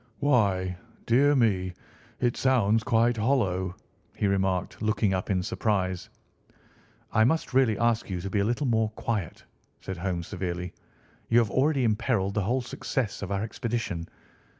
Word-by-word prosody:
"Why, 100 -9 +2 0.3
dear 140 +5 +4
me, 95 -7 +2 0.5
it 120 -1 +1
sounds 115 -5 +3
quite 120 0 +2
hollow!" 95 -7 +1 0.4
he - - -1
remarked, 95 -2 0
looking 105 -2 +1
up 95 - -2
in 95 -2 +1
surprise. 95 -4 -1 1.0
"I 110 - +4
must 150 +4 +1
really 125 -5 +3
ask 115 -2 +1
you 90 -2 -2
to 100 - -4
be 100 - +1
a - - +2
little 120 +6 0
more 110 -3 +2
quiet!" 105 -7 -3 0.4
said 95 -1 -6
Holmes 85 -1 -2
severely. 90 -2 -4 0.6
"You 115 - +4
have 115 -3 +3
already 140 0 +2
imperilled 110 -3 +1
the 105 - 0
whole 120 +7 0
success 120 -2 -3
of 100 - -5
our 100 +1 0
expedition. 110 -7 -3
105 Hz, 150 wpm, -27 LUFS, 95-120 Hz, 1.0 s, dear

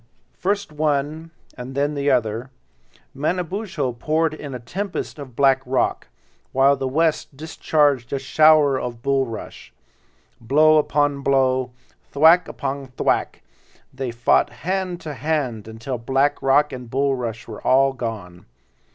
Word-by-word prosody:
First 200 -1 -2
one 150 +1 -1 0.3
and 130 +1 -8
then 145 +2 0
the 140 0 0
other, 120 -1 0 0.6
Manabozho 175 - -2
poured 155 +6 0
in 145 -4 -7
a - - -5
tempest 180 - -5
of 130 -4 -10
black 135 -1 +4
rock, 130 0 -1 0.5
while 135 +1 +4
the 135 - -3
West 155 0 0
discharged 145 -4 0
a 140 - 0
shower 145 0 +4
of 120 -1 -6
bulrush. 135 -5 -3 0.7
Blow 155 +6 +4
upon 145 -1 0
blow, 130 -2 +2 0.4
thwack 160 +5 +5
upon 140 -1 -5
thwack—they 130 -2 -4
fought 120 0 +2
hand 185 0 -3
to 150 - -6
hand 135 -8 -2
until 115 +3 -5
black 135 +4 +1
rock 145 +2 +3
and 125 -2 -8
bulrush 125 -4 -2
were 110 -3 -8
all 135 +1 +3
gone. 105 -8 -7
140 Hz, 125 wpm, -22 LUFS, 125-155 Hz, 0.7 s, thwack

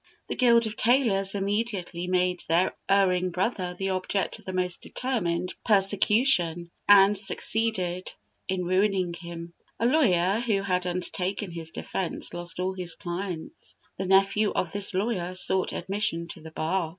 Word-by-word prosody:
The - - -2
Guild 235 -2 +4
of 220 0 -5
Tailors 215 -6 +2
immediately 200 -3 -2
made 180 -1 +1
their 170 +3 +2
erring 185 -2 +3
brother 180 0 -2
the 195 +1 -3
object 185 +1 -2
of - - -19
the 185 - -4
most 180 -1 -2
determined 180 -9 -2
persecution, 195 -4 +3 0.2
and 200 0 +7
succeeded 195 -3 +1 0.4
in 185 -1 -2
ruining 185 -1 +1
him. 170 0 -9 0.3
A 230 - 0
lawyer 210 - +3
who 215 -5 0
had 180 -2 -1
undertaken 180 +2 -3
his 165 -1 -6
defence 180 +2 -4
lost 175 0 -5
all 185 +1 -1
his 180 -2 -3
clients. 175 -2 -6 0.2
The 190 - -2
nephew 195 +2 +3
of 175 - -2
this 200 -1 +4
lawyer 185 -3 -2
sought 185 0 0
admission 190 -4 -1
to - - -8
the 160 - -10
bar. 160 +2 -2
185 Hz, 150 wpm, -26 LUFS, 175-205 Hz, 0.4 s, and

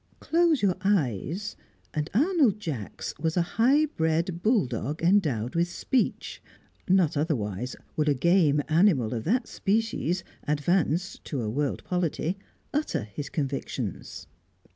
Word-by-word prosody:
Close 330 -6 +2
your 185 -3 +2
eyes, 180 - 0 0.4
and 150 0 -2
Arnold 280 - +3
Jacks 140 - -5
was 160 +2 -1
a 175 - +4 0.2
high 280 +6 +5
bred 165 - -1
bulldog 165 - 0
endowed 150 - +2
with 170 +1 +2
speech; 245 +8 -1 0.5
not 180 -5 +4
otherwise 125 - -2 0.2
would 150 -1 +1
a 145 - +3
game 150 -1 +3
animal 155 - +3
of 115 -2 -4
that 235 +6 +1
species, 200 -4 0 0.2
advanced 165 +4 0
to 135 -6 -3
a 105 - -2
world 145 +3 -1
polity, 180 -1 -1 0.4
utter 295 - -1
his 130 +7 -7
convictions. 140 -3 -4
170 Hz, 125 wpm, -27 LUFS, 145-200 Hz, 0.5 s, high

